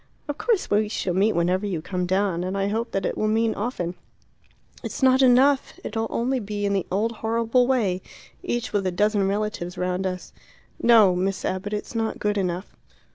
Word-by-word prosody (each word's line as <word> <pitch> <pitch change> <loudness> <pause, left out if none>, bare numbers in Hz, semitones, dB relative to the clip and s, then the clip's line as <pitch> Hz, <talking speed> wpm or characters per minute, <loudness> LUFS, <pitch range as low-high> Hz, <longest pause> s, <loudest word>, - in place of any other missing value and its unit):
"Of 290 0 -4
course 455 -5 0
we 210 +1 +2
shall 190 -4 -2
meet 200 +4 +3
whenever 180 +3 +1
you 180 -5 -2
come 180 +2 -3
down; 185 -2 0
and 185 +2 -3
I 195 0 0
hope 225 +3 -2
that 195 - -2
it - - -1
will 215 - +1
mean 225 +1 +2
often." 200 -6 -3 0.9
"It's - - -5
not 260 0 +5
enough; 265 +2 +4
it'll 225 +1 -2
only 255 +3 0
be 205 -1 -3
in 200 - +1
the 195 -2 -1
old 210 +5 +1
horrible 230 +2 +1
way, 210 -9 +1 0.4
each 240 -9 -3
with 200 -2 +1
a - - 0
dozen 205 +1 +1
relatives 200 -3 -2
round 180 +1 -1
us. 185 -1 -6 0.5
No, 220 -6 +6
Miss 190 +2 -1
Abbott; 190 +2 -2
it's 210 - -4
not 225 -1 -1
good 210 -1 0
enough." 180 0 -3
205 Hz, 190 wpm, -24 LUFS, 185-230 Hz, 0.9 s, No